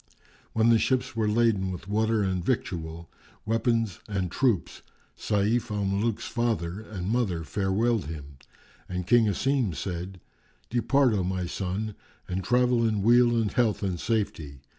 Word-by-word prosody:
When 110 +1 +3
the 115 -1 +5
ships 125 0 0
were 110 -2 +1
laden 105 -4 +2
with 90 +1 -7
water 110 +1 +1
and 95 -2 -1
victual, 85 -8 -3 0.4
weapons 115 -2 0
and 95 -4 -2
troops, 120 -7 0 0.3
Sayf 110 +3 0
al 105 -1 -1
Muluk's 110 +4 -1
father 110 -7 -1
and 95 -5 -6
mother 105 -7 0
farewelled 100 +6 0
him 70 -3 -8 0.5
and 90 -1 -3
King 120 +1 +4
Asim 120 - 0
said, 90 +1 -5 0.5
"Depart, 125 +1 +3
O 100 -3 +1
my 90 0 -2
son, 95 +4 -3 0.3
and 95 +1 -3
travel 125 0 +3
in 110 -3 +1
weal 120 +1 +5
and 110 -2 0
health 115 -5 +1
and 90 -3 -1
safety. 80 - -2
105 Hz, 145 wpm, -27 LUFS, 95-115 Hz, 0.5 s, the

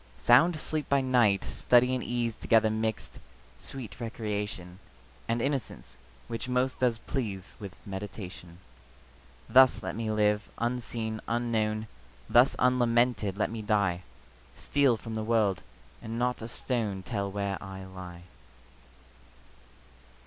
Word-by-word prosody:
Sound 150 +9 +5
sleep 155 -1 -3
by 140 - +4
night; 120 -7 +3
study 125 +1 +3
and 125 - -1
ease 120 -2 -1
Together 110 -1 +3
mixed; 110 0 -3 0.4
sweet 120 -9 -7
recreation, 105 -5 -4 0.5
And 115 +1 0
innocence, 135 -3 -3 0.3
which 115 +2 -4
most 125 +1 0
does 125 -3 +2
please 105 -6 -4
With 100 -2 -8
meditation. 95 -3 -7 0.9
Thus 130 -5 +6
let 95 -1 -4
me 110 0 -2
live, 105 -1 +1
unseen, 115 -2 -2
unknown; 110 -2 0 0.4
Thus 125 +3 +5
unlamented 120 -5 +2
let 105 - 0
me 115 -1 -4
die; 100 -4 +1 0.6
Steal 140 -5 +2
from 115 0 -7
the 110 0 -2
world, 110 -4 +2 0.4
and 115 +1 -5
not 125 0 0
a 110 - -5
stone 110 -5 -2
Tell 100 -2 -3
where 100 -1 -2
I 95 -1 -8
lie. 90 -2 -10
110 Hz, 125 wpm, -29 LUFS, 100-120 Hz, 0.9 s, Thus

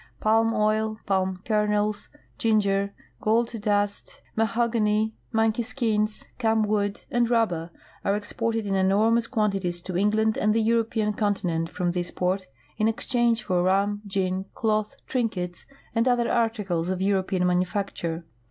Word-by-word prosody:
Palm 225 +1 +3
oil, 215 0 +1
palm 190 -1 0
kernels, 210 -1 0 0.3
ginger, 200 -3 +2 0.3
gold 230 +2 +2
dust, 205 -1 -1 0.2
ma 225 0 +2
hogany, 220 -2 +1 0.2
monkey 225 0 +2
skins, 220 -3 -1
camwood, 215 -3 +1
and 240 -1 +2
rubber 180 -9 +1 0.3
are 200 - +2
exported 225 +1 -2
in 195 - -1
enormous 215 +5 +3
quantities 195 -6 0
to 185 +1 -6
England 215 +3 +2
and 210 +1 +2
the - - +3
European 225 -1 +1
continent 180 -6 0
from 175 0 -1
this 175 0 -2
port 185 +1 -1 0.3
in 215 0 +2
exchange 235 0 +1
for 180 -3 +1
rum, 200 +3 +1
gin, 190 -1 -1
cloth, 215 +3 0
trinkets, 185 -8 -2 0.3
and 230 +2 +2
other 240 -1 +2
articles 210 -8 0
of 185 -1 -1
European 190 -1 +1
manufacture. 180 -2 -1
210 Hz, 135 wpm, -26 LUFS, 190-225 Hz, 0.3 s, Palm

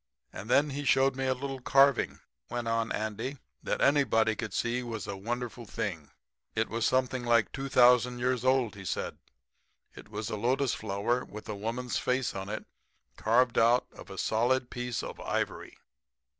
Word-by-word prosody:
"'And 105 - -8
then 145 +3 +4
he 145 +2 -4
showed 135 -1 +3
me 135 0 -1
a 130 - +2
little 135 +1 -5
carving,' 135 +1 +3 0.3
went 120 -1 -3
on 115 0 0
Andy, 110 +6 -3 0.2
'that - - -2
anybody 115 -6 +3
could 110 -2 -4
see 120 +5 -1
was 115 -5 -5
a 100 - -4
wonderful 120 +3 -4
thing. 80 -10 -4 0.5
It - - 0
was 115 +1 0
something 130 -1 +1
like 115 -2 +3
2,000 125 -2 +4
years 125 0 0
old, 130 -4 +2
he 100 - -10
said. 95 - -3 0.7
It - - -13
was 105 0 -4
a - - -1
lotus 130 +4 +1
flower 110 +4 -1
with 105 +1 -10
a 105 - -4
woman's 115 +4 -2
face 125 0 0
in 95 +1 -5
it 110 - -4 0.5
carved 120 +5 +3
out 120 +2 +4
of - - -13
a 95 - -8
solid 120 +5 +1
piece 125 -2 -3
of - - -7
ivory. - - -3
120 Hz, 170 wpm, -30 LUFS, 110-130 Hz, 0.7 s, then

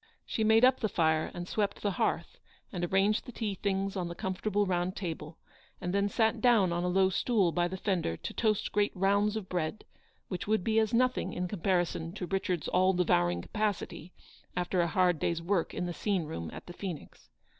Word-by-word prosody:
She 220 - -1
made 220 +2 +6
up 260 0 +4
the 215 - 0
fire 160 -3 +2
and 175 0 -6
swept 205 -1 -1
the 205 - +1
hearth, - - -1 0.3
and 175 -3 -4
arranged 195 +4 +2
the - - -6
tea 220 -3 -3
things 195 0 -1
on 180 -2 -2
the 170 - -6
comfortable 200 +3 -1
round 180 0 -1
table, 165 -3 -5 0.4
and 180 +1 -3
then 200 0 +2
sat 220 +1 +1
down 220 -8 +4
on 175 +1 -1
a - - 0
low 190 +1 +3
stool 200 -3 +2
by 175 +1 +1
the 190 +2 -5
fender 175 - -1
to - - -6
toast 215 -3 0
great 205 0 +2
rounds 200 +3 +2
of 215 -4 -4
bread, 180 +2 -3 0.4
which 180 0 -5
would 215 -3 +2
be 220 +2 +2
as 220 0 +1
nothing 255 +1 +1
in 180 0 -2
comparison 175 -3 -1
to 190 -2 -4
Richard's 185 -2 -1
all 185 +1 +3
devouring 85 - +2
capacity 205 -5 -3 0.5
after 180 0 +1
a 170 - +1
hard 180 -1 +2
day's 170 +2 0
work 170 +1 0
in - - -3
the 175 - -3
scene 195 -1 0
room 85 - -5
at - - -9
the 175 - -9
Phoenix. 175 -5 -8
185 Hz, 205 wpm, -30 LUFS, 175-205 Hz, 0.5 s, made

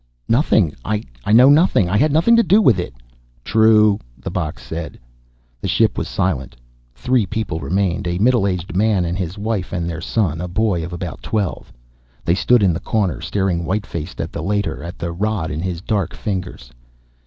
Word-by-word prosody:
"Nothing 110 - +3
I 105 0 -2 0.3
know 125 +5 +7
nothing. 145 - +4
I 90 - -1
had 150 +8 +3
nothing 170 +11 +4
to 230 - +6
do 200 0 +4
with 120 - +4
it." 90 - -4 0.5
"True," 110 - +4 0.2
the - - -6
box 75 -5 -4
said. 80 +3 -6 0.6
The - - -3
ship - - +2
was - - -3
silent. 75 -8 -2 0.4
Three 115 - +1
people 105 -6 -3
remained, 95 +1 -1
a 85 0 -1
middle 115 0 +3
aged 90 -2 -3
man 100 -2 +2
and 85 +1 -2
his 90 0 -4
wife 105 -3 -2
and 85 -2 -2
their 85 0 -4
son, 90 -5 -1
a 90 - -3
boy 90 -2 0
of 85 - -6
about 85 -1 -6
twelve. 105 -4 -3 0.5
They 85 - +3
stood 120 +4 +3
in 90 -3 +3
the 80 - -3
corner, 95 - -1
staring 95 -4 -1
white 100 +4 -2
faced 85 0 -6
at - - -3
the - - -5
Leiter, 100 +3 -2
at 85 +2 -8
the 85 - -4
rod 100 -2 -2
in 75 +1 -3
his 90 -2 -3
dark 100 -4 -2
fingers. 90 - -5
95 Hz, 190 wpm, -19 LUFS, 85-110 Hz, 0.6 s, know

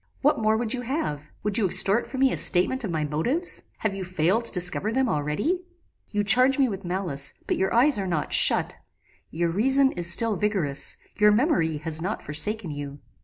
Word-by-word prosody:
What 295 -2 +2
more 220 0 +1
would 230 0 -2
you 250 - -4
have? 230 - -4
Would 210 +1 0
you 200 - +1
extort 200 +5 +3
from 265 - -6
me 270 -1 +3
a - - -3
statement 240 +9 +5
of 210 - -4
my 160 -2 -2
motives? 235 - -1 0.2
Have 215 -3 -3
you 195 -1 -6
failed 185 +5 -1
to - - -3
discover 180 +3 0
them 260 +2 0
already? 205 - -2 0.4
You 205 -1 -2
charge 255 +5 +4
me 270 -2 +2
with 200 -3 -6
malice; 175 -6 -2
but - - -1
your 190 - -1
eyes 245 +1 +3
are 195 - -3
not 165 -4 -3
shut; - - +3 0.5
your 170 +1 -2
reason 265 +8 +2
is 175 -1 -2
still 220 +3 +1
vigorous; 180 -10 -1 0.2
your 210 0 +4
memory 200 - 0
has 160 +1 0
not 195 +5 -4
forsaken 185 +5 -1
you. 145 -1 -7
205 Hz, 200 wpm, -24 LUFS, 165-240 Hz, 0.5 s, statement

